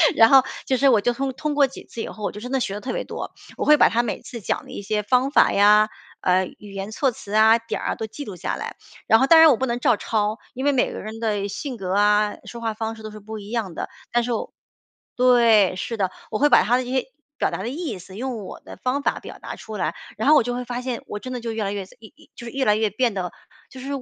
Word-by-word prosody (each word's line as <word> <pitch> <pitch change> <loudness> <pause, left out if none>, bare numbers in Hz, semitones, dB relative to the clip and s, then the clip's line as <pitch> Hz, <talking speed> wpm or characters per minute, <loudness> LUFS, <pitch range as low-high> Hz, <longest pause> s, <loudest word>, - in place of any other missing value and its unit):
然 225 0 +7
后 270 -1 +8 0.2
就 260 - +1
是， 275 +2 +4
我 230 -5 +5
就 245 - +2
通 270 +2 -2
通 300 +3 -3
过 285 -2 +4
几 265 - -11
次 230 - -7
以 - - -4
后， 215 - -9
我 - - -1
就 210 - -9
真 250 +4 -7
的 270 - +1
学 195 - -2
得 205 - -4
特 255 - -4
别 - - -2
多。 - - -6 0.3
我 - - -2
会 300 - +7
把 - - +6
她 235 - +2
每 235 -3 -3
次 235 - -8
讲 - - -2
的 - - -12
一 - - -6
些 210 +1 -1
方 250 +5 +2
法 290 - +4
呀， 210 +1 +5 0.3
呃， 185 +1 +3
语 205 -1 -12
言 195 +1 -5
措 255 +4 0
辞 205 -2 -11
啊， 220 +1 +6
点 230 -1 -4
儿 - - -3
啊， - - -2
都 220 - -5
记 285 +7 -8
录 200 -5 -7
下 - - -3
来。 - - -6 0.3
然 225 - +6
后 265 - +3
当 325 +1 +8
然 320 -1 +9
我 240 - +2
不 265 - -1
能 235 +1 -1
照 245 -3 +3
抄， 215 +1 -1 0.2
因 260 - -3
为 285 - +4
每 260 - +1
个 - - -6
人 220 +1 -7
的 205 -3 -1
性 255 +5 -5
格 190 -2 -3
啊， 210 +1 +3
说 235 -1 -8
话 225 -1 -1
方 225 +1 -4
式 220 - -13
都 215 - -7
是 215 - -10
不 220 +2 -8
一 205 0 -10
样 215 -8 -3
的。 - - -4 0.2
但 240 0 +2
是 245 - -3
我 220 - -4 0.6
对， 235 -6 +5
是 225 +5 -4
的， 190 -2 +1 0.2
我 215 - -1
会 295 - +4
把 - - +6
她 245 +3 +3
的 255 - -1
这 245 - -7
些 260 -1 0 0.3
表 - - 0
达 - - -3
的 235 - -3
意 300 - -4
思， 185 +1 -12
用 245 -4 -4
我 - - -9
的 - - -11
方 255 +3 -1
法 - - 0
表 - - -10
达 - - -7
出 220 - -9
来。 170 -3 -1 0.2
然 220 +6 +1
后 305 - +8
我 - - +6
就 245 - -2
会 250 - -3
发 245 0 -4
现， 250 -2 -4
我 210 - -5
真 255 +2 -7
的 245 - -4
就 230 0 -3
越 220 -1 -2
来 200 - -2
越 195 -2 -4
自 - - -19
一 220 - -12
一 - - -21
就 240 - -10
是 - - -6
越 270 -1 -1
来 210 - +4
越 215 0 +1
变 230 +3 0
得 180 -3 -3 0.4
就 260 - -11
是 265 - -8
225 Hz, 325 characters per minute, -23 LUFS, 210-255 Hz, 0.6 s, 然